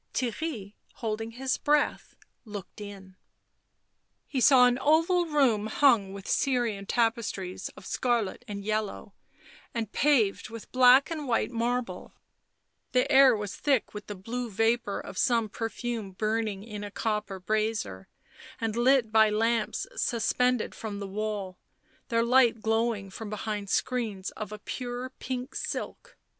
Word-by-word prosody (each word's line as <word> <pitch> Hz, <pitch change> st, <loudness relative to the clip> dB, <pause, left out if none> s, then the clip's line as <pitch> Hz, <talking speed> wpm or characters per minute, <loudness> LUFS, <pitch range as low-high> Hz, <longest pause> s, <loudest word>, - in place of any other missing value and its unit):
Theirry, 240 Hz, -4 st, -3 dB, 0.2 s
holding 225 Hz, 0 st, -4 dB
his 260 Hz, +2 st, -1 dB
breath, 295 Hz, 0 st, +1 dB, 0.3 s
looked 210 Hz, -2 st, -9 dB
in. 195 Hz, -2 st, -10 dB, 1.1 s
He 265 Hz, -, -2 dB
saw 255 Hz, -1 st, +7 dB
an 245 Hz, 0 st, +2 dB
oval 330 Hz, +4 st, +3 dB
room 255 Hz, -9 st, +2 dB
hung 220 Hz, -5 st, +3 dB
with 195 Hz, -1 st, -9 dB
Syrian 235 Hz, -7 st, 0 dB
tapestries 225 Hz, -5 st, -1 dB
of -, -, -12 dB
scarlet 235 Hz, -6 st, -1 dB
and 200 Hz, -1 st, -6 dB
yellow, 215 Hz, -1 st, -2 dB, 0.6 s
and 225 Hz, -2 st, -2 dB
paved 250 Hz, -10 st, +2 dB
with 230 Hz, -1 st, -10 dB
black 255 Hz, +3 st, +6 dB
and 305 Hz, -3 st, -4 dB
white 235 Hz, -1 st, +1 dB
marble; 240 Hz, +1 st, -2 dB, 0.8 s
the 250 Hz, 0 st, +2 dB
air 265 Hz, -2 st, +7 dB
was 205 Hz, -1 st, -5 dB
thick 275 Hz, -5 st, +1 dB
with 210 Hz, 0 st, -8 dB
the 205 Hz, -, -5 dB
blue 235 Hz, +6 st, -4 dB
vapour 225 Hz, 0 st, +1 dB
of 185 Hz, -, -7 dB
some 230 Hz, -3 st, +2 dB
perfume 225 Hz, -1 st, -4 dB
burning 215 Hz, -1 st, -1 dB
in 210 Hz, -2 st, -7 dB
a 205 Hz, -, -5 dB
copper 210 Hz, -2 st, -2 dB
brazier, 215 Hz, -, -2 dB, 0.5 s
and 225 Hz, -1 st, -2 dB
lit 240 Hz, -1 st, +3 dB
by 220 Hz, -1 st, +6 dB
lamps 225 Hz, +1 st, 0 dB
suspended 250 Hz, -, +1 dB
from 215 Hz, -2 st, -6 dB
the 200 Hz, -, -5 dB
wall, 200 Hz, -2 st, -4 dB, 0.5 s
their 230 Hz, -1 st, +2 dB
light 240 Hz, -1 st, +4 dB
glowing 225 Hz, -3 st, 0 dB
from 215 Hz, +2 st, -7 dB
behind 210 Hz, -1 st, -4 dB
screens 220 Hz, -7 st, -1 dB
of 215 Hz, -1 st, -7 dB
a 215 Hz, -, -6 dB
pure 245 Hz, +3 st, -5 dB
pink 255 Hz, +1 st, -4 dB
silk. -, -, -5 dB
225 Hz, 140 wpm, -28 LUFS, 205-250 Hz, 1.1 s, saw